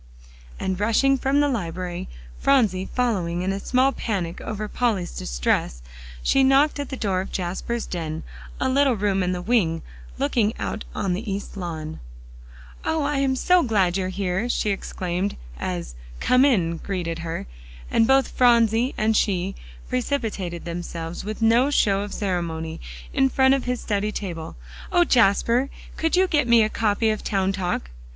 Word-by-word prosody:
And 190 -1 -2
rushing 230 +6 +3
from 270 +2 +2
the 290 - +3
library, 180 - -3 0.3
Phronsie 215 -9 +2
following 180 -9 0
in 190 +1 0
a 195 - -3
small 255 +6 +2
panic 185 -10 -3
over 215 0 -4
Polly's 210 -6 0
distress, - - -1 0.4
she 270 - +4
knocked 275 +3 +4
at 285 - -4
the 265 - -5
door 190 -5 0
of 190 - -7
Jasper's 190 +6 -3
den, 160 -2 -4 0.4
a - - +1
little 270 -1 +3
room 200 -2 +1
in 180 0 0
the 180 -1 -3
wing, 175 -7 +1 0.3
looking 215 - +1
out 215 - -4
on 190 -2 0
the 205 +3 -3
east 200 +2 -5
lawn. 160 -4 -5 0.8
"Oh! 320 -1 0
I 290 0 0
am 270 -1 +2
so 360 +7 +4
glad 195 - +2
you 190 -1 0
are - - -2
here," 190 +4 -1
she 215 -3 +1
exclaimed 185 0 -3 0.2
as 85 -7 -4 0.3
"Come 255 +2 +4
in!" 175 -11 +2
greeted 170 -3 -3
her, 165 0 -4 0.5
and 225 - +4
both 270 0 +4
Phronsie 235 0 +3
and 220 +1 +2
she 195 -2 +1 0.3
precipitated 225 - -2
themselves 170 -1 -5
with 215 +2 -4
no 235 +5 +4
show 200 -8 +2
of 205 0 -5
ceremony, 170 -5 -3 0.3
in 270 0 +3
front 265 +1 +4
of 275 - 0
his 250 -1 -1
study 210 0 -1
table. 170 -7 -5 0.4
"O 350 - +5
Jasper! 235 - +3 0.3
could 325 +1 +1
you 370 +1 +5
get 295 -7 +2
me 235 -1 +6
a 215 - +1
copy 220 0 +1
of 215 - -4
"Town 195 -1 +1
Talk?" 180 - -2
205 Hz, 165 wpm, -24 LUFS, 180-250 Hz, 0.8 s, me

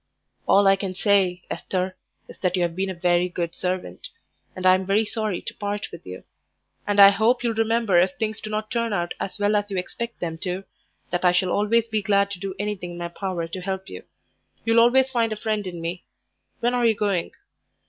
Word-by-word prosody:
"All 200 +1 +5
I 195 0 +6
can 195 -2 -4
say, 190 -3 +2
Esther, 185 0 -2 0.3
is - - -13
that 180 -1 0
you 180 - +1
have 170 -1 -1
been 190 +1 -1
a - - -2
very 175 +1 +2
good 170 -1 -3
servant, 185 - -4 0.5
and 185 - -5
I'm 185 +1 +5
very 200 +4 +2
sorry 215 -4 -3
to - - -6
part 205 0 -4
with 170 - -11
you. 90 0 -8 0.6
And 205 0 +1
I 200 0 +10
hope 225 +5 +2
you'll 235 -1 +1
remember 225 -3 +2
if 185 +2 +4
things 220 +1 -3
do 215 - -6
not 215 0 -3
turn 230 -2 0
out 175 -3 -1
as 195 - -4
well 205 +1 +2
as 205 0 0
you 195 - -3
expect 235 +6 -5
them 165 -2 -4
to, 185 +1 -3 0.5
that 175 0 -1
I 180 -1 +5
shall 180 0 +1
always 225 +3 +2
be 220 -2 -1
glad 200 0 +2
to 195 - -5
do 195 0 -5
anything 200 -4 -4
in - - -9
my 170 0 -4
power 175 -2 -3
to 185 +2 -6
help 190 +1 -4
you. - - -8 0.6
You'll 225 0 +4
always 260 +3 +5
find 230 -3 +1
a - - -1
friend 215 -2 -2
in 175 -2 -6
me. 170 +2 -4 0.6
When 240 +1 +1
are 245 -1 +3
you 225 - +3
going?" 200 -5 -1
195 Hz, 220 wpm, -24 LUFS, 180-215 Hz, 0.6 s, I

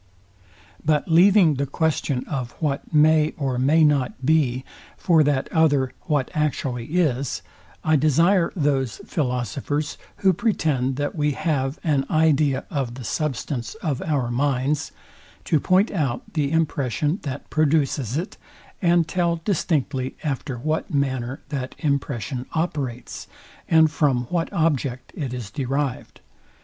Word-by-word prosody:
But 150 -1 +1
leaving 180 0 +6
the 140 +1 -1
question 140 -3 -1
of 130 -5 -4
what 145 -3 -3
may 155 0 +4
or 135 -4 -1
may 150 +5 +4
not 135 -3 +1
be, 135 -4 +2 0.3
for 165 -3 +4
that 140 -2 +1
other 145 -6 +3
what 145 -5 0
actually 135 -5 -1
is, 140 -7 0 0.4
I 155 -1 +3
desire 165 +5 +3
those 135 - 0
philosophers, 140 - -2 0.3
who 190 - +6
pretend 155 - 0
that 145 +1 -2
we 150 -2 +1
have 135 -1 -1
an 140 -4 +1
idea 150 -3 +2
of 130 -5 -2
the 130 - -8
substance 130 - -3
of 155 - -3
our 135 -6 -1
minds, 135 +2 0 0.5
to 155 - +2
point 185 +7 +3
out 140 - -1
the 150 -3 0
impression 150 - 0
that 140 -1 -6
produces 145 -5 +1
it, 180 +6 -4 0.4
and 170 -2 +3
tell 170 -1 0
distinctly 145 -8 -1
after 135 -4 -3
what 155 +8 -2
manner 130 -3 -1
that 135 -3 -4
impression 140 -3 -2
operates, 145 -7 -3 0.4
and 160 -1 +5
from 135 -6 +1
what 170 -2 -1
object 140 -6 -1
it 140 -6 -4
is 120 -6 -6
derived. 135 +1 -3
145 Hz, 130 wpm, -23 LUFS, 130-160 Hz, 0.5 s, leaving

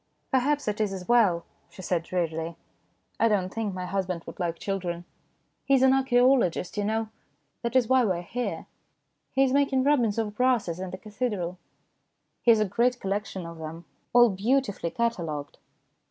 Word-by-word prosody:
" - - -46
Perhaps 280 +2 +2
it 210 +1 -1
is 205 -2 0
as 185 -2 -7
well," 205 -8 +3 0.2
she 185 - -11
said 175 -2 0
drearily. 165 -1 -2 0.3
" - - -43
I 230 - +5
don't 195 -4 0
think 215 -4 -2
my 185 0 -4
husband 180 -2 -2
would - - -10
like 170 -2 -1
children. 175 -3 -3 0.6
He 275 - +3
is 260 - +3
an 265 0 +6
archaeologist, 250 -8 +3
you 205 - -1
know. 220 +1 -1 0.5
That 235 0 -3
is 250 -3 +4
why 260 0 +4
we 200 -5 +2
are 170 - -4
here. 245 +7 -4 0.7
He 270 - +4
is 265 -1 +2
making 275 -2 +3
rubbings 245 -7 +2
of 210 -2 -2
brasses 235 -9 +1
in 190 0 -4
the 185 - -6
cathedral. 205 -5 -3 0.8
He - - +2
has 225 -2 +7
a 215 - +3
great 245 +5 +1
collection 195 -2 -3
of 170 -1 -9
them, 160 +2 -7 0.3
all 240 -2 +6
beautifully 205 -2 0
catalogued." 165 -11 -3
210 Hz, 185 wpm, -27 LUFS, 180-245 Hz, 0.8 s, has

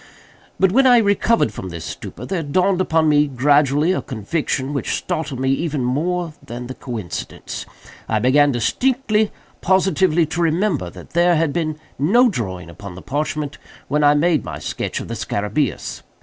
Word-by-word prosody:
But, 190 -1 +4
when 265 +5 +5
I 245 -1 +7
recovered 205 - +2
from 95 - -6
this 85 -2 -7
stupor, 125 - -7
there 175 +4 -2
dawned 180 +5 +1
upon 160 -3 +2
me 150 0 +4
gradually 145 +4 +3
a 185 - 0
conviction 130 +3 -2
which 140 - -1
startled 145 -5 -3
me 130 0 +1
even 150 0 -1
far 125 0 0
more 175 +2 -1
than 120 +1 -7
the 130 - -6
coincidence. 115 -9 -6 0.4
I 110 - +2
began 140 +6 +4
distinctly, 215 - +1 0.3
positively, 185 -3 +3
to 165 +3 -3
remember 165 - +1
that 90 0 -13
there 175 +1 +4
had 160 -2 +1
been 155 -3 -1 0.2
no 235 - +5
drawing 95 - -4
upon 90 +2 -10
the 95 - -10
parchment 150 +1 -3 0.3
when 150 +1 +1
I 145 0 +6
made 160 +1 +2
my - - -6
sketch - - -4
of - - -7
the - - -5
scarabæus. 105 - -2
150 Hz, 170 wpm, -20 LUFS, 130-180 Hz, 0.4 s, I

